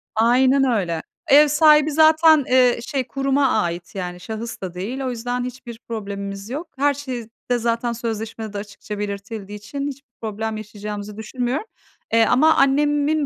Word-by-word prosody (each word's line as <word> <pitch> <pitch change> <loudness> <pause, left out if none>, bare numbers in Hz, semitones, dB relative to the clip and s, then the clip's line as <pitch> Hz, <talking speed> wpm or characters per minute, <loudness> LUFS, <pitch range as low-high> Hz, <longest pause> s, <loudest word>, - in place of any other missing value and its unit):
Aynen 255 +4 +4
öyle. 190 -10 0 0.3
Ev 295 +2 +7
sahibi 300 0 +5
zaten, 315 -1 +5
eee, 250 -1 +4
şey, 265 -3 -2
kuruma 275 0 +1
ait 175 -4 -1
yani 180 -2 -5
şahıs 225 +4 -6
da 185 -2 -5
değil. 210 +9 -4
O 260 - -1
yüzden 245 +1 -3
hiçbir 245 -2 -8
problemimiz 200 -2 -5
yok. 310 +6 -5
Her 285 +1 +3
şey 260 -5 -6 0.2
de 245 - +4
zaten 235 0 -1
sözleşmede 225 -2 -5
de - - -4
açıkça 205 0 -7
belirtildiği 205 0 -5
için 255 +7 -5
hiçbir 280 -1 -8
problem 220 0 -3
yaşayacağımızı 210 0 -7
düşünmüyorum. 245 - -3 0.5
Eee, 230 0 +5
ama 305 +8 +5
annemin, 290 +2 +2
235 Hz, 155 wpm, -21 LUFS, 210-275 Hz, 0.5 s, Ev